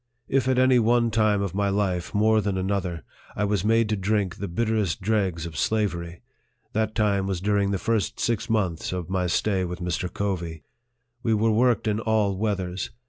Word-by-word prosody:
If 130 -2 +1
at 130 -1 +2
any 130 -1 +5
one 115 0 +3
time 105 -2 +2
of 100 - -3
my 100 +1 +1
life 95 -3 -1
more 110 +1 +3
than 100 -2 -1
another, 95 -4 -2 0.3
I 105 - -1
was 100 -2 0
made 115 +1 +3
to 110 - +1
drink 100 -2 0
the 100 - -4
bitterest 105 -1 0
dregs 95 -5 0
of 85 -2 -7
slavery, 85 -3 -1 0.5
that 110 0 -1
lime 100 -3 +1
was 95 -2 -2
during 100 +1 +1
the 100 - 0
first 110 +3 -1
six 115 0 -1
months 95 -8 0
of 90 0 -4
my 90 -1 0
stay 95 +2 +1
with 90 -1 -4
Mr. 90 0 -2
Covey. 85 -6 -3 0.6
We 115 -3 +1
were 110 +1 +2
worked 115 0 +2
in 105 0 +1
all 110 -3 +1
weathers. 95 -3 -2
100 Hz, 190 wpm, -25 LUFS, 90-110 Hz, 0.6 s, any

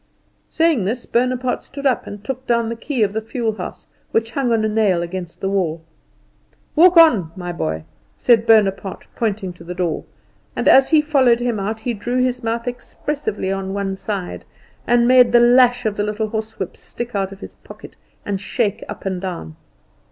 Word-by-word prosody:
Saying 320 - +2
this, 235 +5 -3
Bonaparte 250 +1 0
stood 280 0 -9
up 260 -3 +1
and 205 0 -8
took 260 +2 -5
down 235 -1 +1
the 230 - -3
key 245 0 -1
of 200 -1 0
the 220 - -1
fuel 225 0 -2
house, 180 - -7 0.2
which 225 0 0
hung 250 -1 0
on 220 -1 +2
a - - +2
nail 210 -5 +2
against 175 -1 -7
the 195 - -1
wall. 170 -5 -1 0.9
"Walk 350 +2 +6
on, 230 - +6
my 180 -2 -5
boy," 80 - -3 0.3
said 230 - +3
Bonaparte, 200 -4 +2
pointing 200 -5 -2
to 175 - -14
the 175 +1 -7
door; 175 -3 -2 0.5
and - - -1
as 265 0 +6
he 315 -2 +5
followed 265 -6 +3
him 240 -3 -1
out 215 +3 -3
he 240 +2 -2
drew 240 +4 -3
his 250 -1 0
mouth 230 +1 -2
expressively 245 -4 -4
on 195 0 -3
one 195 -1 -2
side, 195 -2 -5 0.4
and 240 0 +4
made 250 -2 +6
the 240 - +7
lash 245 0 +5
of 210 -2 -1
the 205 - 0
little 210 +1 -2
horsewhip 220 -4 -5
stick 240 0 -7
out 195 -1 -1
of 195 +1 -12
his - - -9
pocket - - -13 0.3
and 195 -2 -2
shake 210 0 -1
up - - -8
and 190 -2 -2
down. 170 - -6
220 Hz, 190 wpm, -20 LUFS, 195-245 Hz, 0.9 s, the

